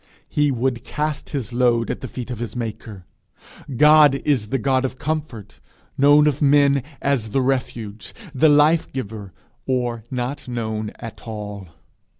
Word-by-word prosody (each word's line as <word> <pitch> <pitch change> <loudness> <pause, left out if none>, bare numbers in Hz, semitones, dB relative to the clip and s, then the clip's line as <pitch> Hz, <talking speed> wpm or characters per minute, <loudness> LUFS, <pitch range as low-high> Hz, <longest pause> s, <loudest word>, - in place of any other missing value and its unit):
He 150 0 +1
would 125 -2 -1
cast 150 +3 -3
his 125 -6 -4
load 120 -2 +2
at - - -6
the 130 - -5
feet 125 0 -7
of 120 - -5
his 115 -2 -5
maker! 110 -5 -6 0.7
God 150 -1 +7
is 130 -8 +1
the 135 - -1
God 130 +2 +1
of 130 0 -3
comfort, 145 -9 -5 0.4
known 145 +2 +5
of 150 -1 0
man 140 -1 +4 0.2
as 135 -6 0
the 135 +5 +1
refuge, 115 -6 -3 0.2
the 150 +3 +4
life 150 +3 +4
giver, 105 -6 -6 0.4
or 120 -3 -1
not 125 +2 -4
known 110 -3 -3
at 115 0 -10
all. 105 -3 -6
125 Hz, 150 wpm, -21 LUFS, 110-140 Hz, 0.7 s, God